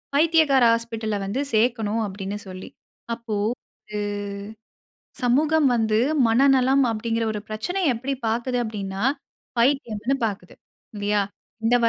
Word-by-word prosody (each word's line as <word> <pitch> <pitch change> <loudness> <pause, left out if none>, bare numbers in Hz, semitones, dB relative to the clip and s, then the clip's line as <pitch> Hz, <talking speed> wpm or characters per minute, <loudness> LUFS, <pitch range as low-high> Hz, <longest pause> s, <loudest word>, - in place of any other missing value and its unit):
பைத்தியக்கார 310 -4 +4
ஹாஸ்பிட்டல்ல 225 -2 -2
வந்து 225 +8 -2
சேர்க்கணும்." 225 -1 +1
அப்படின்னு 195 +1 -5
சொல்லி. 185 0 -8 0.5
அப்போ 230 -2 -5 0.6
அ - - 0 1.3
சமூகம் 295 +5 +3
வந்து 220 -2 +2 0.3
மனநலம் 265 +3 +4
அப்படிங்கிற 230 +1 -1
ஒரு 210 - -4
பிரச்சனைய 295 - 0
எப்படி 260 +4 -3
பாக்குது 240 +3 -1
அப்படின்னா, 200 -3 -4 0.6
பைத்தியம்ன்னு 240 -2 +1
பாக்குது 200 -4 -4 0.4
இல்லையா. 205 0 +1 0.4
இந்த 230 +2 +4
230 Hz, 105 wpm, -24 LUFS, 215-265 Hz, 1.3 s, பைத்தியக்கார